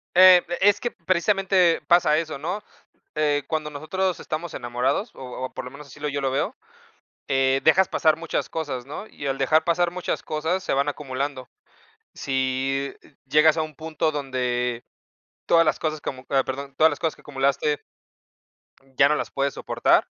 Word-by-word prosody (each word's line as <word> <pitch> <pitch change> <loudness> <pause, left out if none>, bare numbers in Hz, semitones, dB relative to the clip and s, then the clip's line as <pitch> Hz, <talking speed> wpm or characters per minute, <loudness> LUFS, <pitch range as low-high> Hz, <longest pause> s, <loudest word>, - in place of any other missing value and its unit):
Eh, 185 -1 +9 0.2
es 205 +1 +4
que 240 - -2
precisamente 185 0 +2
pasa 170 -3 +4
eso, 160 -4 -3
¿no?, 180 +8 -3 0.5
eh, 145 -2 +1
cuando 155 -1 -2
nosotros 175 +6 -2
estamos 160 +2 -5
enamorados, 125 - -1
o 130 0 -6
o - - -8
por - - -6
lo 125 - -8
menos 140 +1 -11
así 140 +2 -14
lo 150 0 -2
yo 140 0 -3
lo 135 -1 0
veo, 170 - -1 0.7
eh, 135 0 +2
dejas 185 +4 +5
pasar 155 -1 +2
muchas 165 -1 -3
cosas, 140 -6 -4
¿no?, 175 +9 -7
y 140 - -7
al 135 0 -1
dejar 155 +4 +3
pasar 170 +1 +1
muchas 180 0 -3
cosas, 160 +5 -2
se - - -1
van 140 +2 +1
acumulando. 140 -2 -4 0.6
Sí, 135 +1 -1
eh, 140 - -22
llegas 155 +3 +5
a - - +2
un 155 -2 -9
punto 160 0 -1
donde 125 -4 -2 0.6
todas 165 -1 +5
las 155 - +1
cosas 155 -2 -2
como 130 -1 -6
ah, 135 -1 +3
perdón, 140 +1 -6
todas 160 +1 +6
las - - -5
cosas 160 -2 -1
que - - -19
acumulaste, 140 +1 0 1.0
mm, 135 -1 -27
ya 140 0 +6
no 150 - +2
las - - -3
puedes 140 0 -1
soportar, - - +2
150 Hz, 180 wpm, -24 LUFS, 135-165 Hz, 1.0 s, Eh